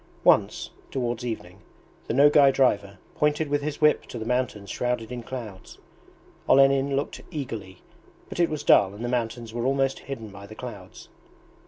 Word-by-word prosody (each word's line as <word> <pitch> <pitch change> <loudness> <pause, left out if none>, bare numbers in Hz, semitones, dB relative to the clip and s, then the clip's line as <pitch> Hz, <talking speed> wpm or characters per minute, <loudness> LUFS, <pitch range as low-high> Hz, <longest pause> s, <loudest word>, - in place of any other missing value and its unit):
Once, - - +3 0.2
towards 120 -3 -2
evening, 100 -6 -6 0.5
the - - -1
Nogay 145 0 +6
driver 100 -7 +1 0.2
pointed 150 0 +1
with 145 0 +1
his 150 0 -4
whip 150 0 +3
to - - -7
the 110 - -5
mountains 115 -5 -2
shrouded 125 -2 -2
in 125 -1 -5
clouds. 115 -6 -8 0.7
Olenin 135 0 +5
looked 140 - -3
eagerly, 115 - -6 0.4
but - - -8
it 170 - +3
was 155 -2 -4
dull 100 0 +5
and 115 +3 -5
the - - -1
mountains 115 -2 -3
were 120 +1 -1
almost 135 0 +1
hidden 115 -6 -7
by 100 0 -11
the 110 - -11
clouds. - - -9
125 Hz, 165 wpm, -26 LUFS, 110-140 Hz, 0.7 s, Nogay